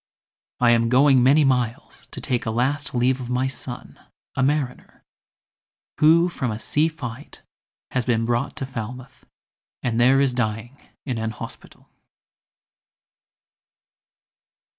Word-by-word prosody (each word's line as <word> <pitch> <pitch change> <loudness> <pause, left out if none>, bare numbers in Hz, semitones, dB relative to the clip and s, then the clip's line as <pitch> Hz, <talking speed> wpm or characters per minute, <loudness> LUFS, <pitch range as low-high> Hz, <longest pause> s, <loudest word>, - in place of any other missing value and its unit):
I 120 -1 +5
am 115 0 +3
going 130 +1 +5
many 140 +5 +5
miles 125 -3 -1
to - - -8
take 120 -3 -2
A - - +1
last 130 +5 -1
leave 130 +2 +1
of 125 - -6
my 125 +1 0
son, 130 -2 -7 0.4
a - - 0
mariner, 140 -1 -2 1.0
Who 165 +3 +5
from 135 -8 -3
a 110 - -3
sea 150 +7 +1
fight 145 -4 -8 0.5
has 130 - 0
been 115 -1 +1
brought 120 +4 -1
to 145 -3 -4
Falmouth, 125 +1 -8 0.6
And 120 -2 0
there 130 +3 +5
is 135 -2 +2
dying 115 +1 -3 0.3
in 125 -5 -3
an 110 0 -2
hospital." 110 - -10
125 Hz, 130 wpm, -23 LUFS, 120-135 Hz, 1.0 s, I